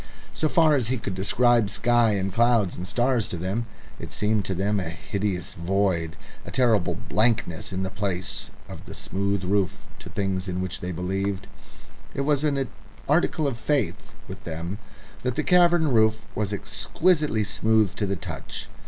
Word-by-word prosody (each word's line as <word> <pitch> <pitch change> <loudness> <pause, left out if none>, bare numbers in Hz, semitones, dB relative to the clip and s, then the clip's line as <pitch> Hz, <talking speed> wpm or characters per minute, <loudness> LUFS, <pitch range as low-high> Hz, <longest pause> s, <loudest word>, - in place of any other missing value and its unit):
So 155 - 0
far 160 -2 +5
as 125 -6 +1
he 130 +2 0
could 100 -4 -4
describe 115 +3 +3
sky 120 -1 +3
and 95 -1 -1
clouds 115 -5 +3
and 90 - -5
stars 120 -1 +1
to 90 - -5
them 95 +7 -2 0.3
it - - -7
seemed 105 -1 +1
to 95 - -1
them 100 +3 +1
a 85 -4 -3
hideous 95 +1 -3
void, 85 -2 0 0.3
a - - -8
terrible 115 -7 +2
blankness 110 -7 0
in 95 0 -2
the 95 - -3
place 100 -2 -3 0.2
of - - -10
the - - -9
smooth 100 0 -1
roof 95 -2 0
to - - -10
things 95 -1 -2
in 90 0 -2
which 95 -1 -3
they 90 - -3
believed 95 +3 -2 0.7
it 140 - 0
was 145 0 +2
an 140 -3 +1 0.4
article 155 +1 +2
of 130 -4 -1
faith 140 -5 -1 0.2
with - - -9
them 85 +5 -5 0.4
that 125 -1 -1
the - - 0
cavern 175 -3 +5
roof 110 -2 +3
was 105 -1 -1
exquisitely 110 - +1
smooth 110 -2 +2
to 105 - 0
the 100 - 0
touch. 85 - -7
105 Hz, 170 wpm, -25 LUFS, 95-120 Hz, 0.7 s, far